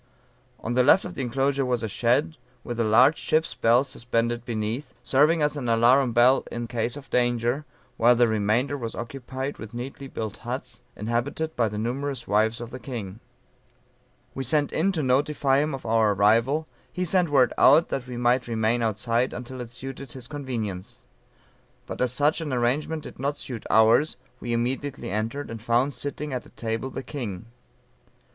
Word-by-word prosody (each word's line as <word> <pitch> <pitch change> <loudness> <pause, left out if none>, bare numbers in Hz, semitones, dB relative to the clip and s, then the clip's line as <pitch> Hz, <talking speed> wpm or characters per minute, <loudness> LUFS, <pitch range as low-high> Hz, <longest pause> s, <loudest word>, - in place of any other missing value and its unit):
On 115 - -3
the 125 - +4
left 145 +9 +5
of 180 - -6
the 145 - -4
enclosure 135 +2 0
was 125 -2 -1
a - - -1
shed, 120 +9 +1 0.3
with 120 -1 -5
a - - +3
large 125 +8 +5
ship's 160 +1 0
bell 120 +3 +3
suspended 120 -3 -2
beneath, 115 +4 -4
serving 150 +4 +3
as 150 0 +1
an 130 -5 -3
alarum 120 +3 +4
bell 120 +3 +5
in 120 0 -3
case 115 +2 -2
of 135 -3 -12
danger, 120 +3 +1 0.3
while 120 +2 +5
the 120 0 +4
remainder 110 +6 +1
was 115 -5 -5
occupied 130 +3 -5
with 110 +1 -9
neatly 135 +3 -6
built 110 -5 -5
huts, - - -6
inhabited 120 +9 -2
by 115 -3 +1
the 105 - -6
numerous 135 +5 -3
wives 110 +2 +2
of 120 -1 -7
the 130 - -7
king. 115 -6 -6 1.1
"We 135 - -4
sent 145 +3 +1
in 190 +5 +2
to 160 -4 -1
notify 135 +1 +2
him 150 -1 0
of 135 - -10
our 110 -2 +3
arrival; 115 +10 +3 0.3
he 180 0 -2
sent 180 -1 +2
word 130 -4 +4
out 155 +5 +6
that 135 -2 -3
we 125 -1 -6
might 120 +1 +2
remain 115 +1 +1
outside 115 +3 0
until 125 +1 -7
it 120 - -7
suited 135 +2 -8
his 125 -2 -8
convenience. 115 -10 -5 0.8
But - - -6
as 125 -2 +2
such 145 +5 +1
an 155 -3 -4
arrangement 135 +6 0
did - - -11
not 140 +2 -1
suit 120 -6 -7
ours, 115 +7 +4 0.2
we 120 - -5
immediately 130 +2 -2
entered, 115 +8 -3
and 115 -1 -7
found 120 +5 +1
sitting 145 +1 -5
at 125 - -4
a - - -17
table 115 +3 -4
the 135 - -6
king. 115 -9 -6
125 Hz, 180 wpm, -25 LUFS, 115-140 Hz, 1.1 s, out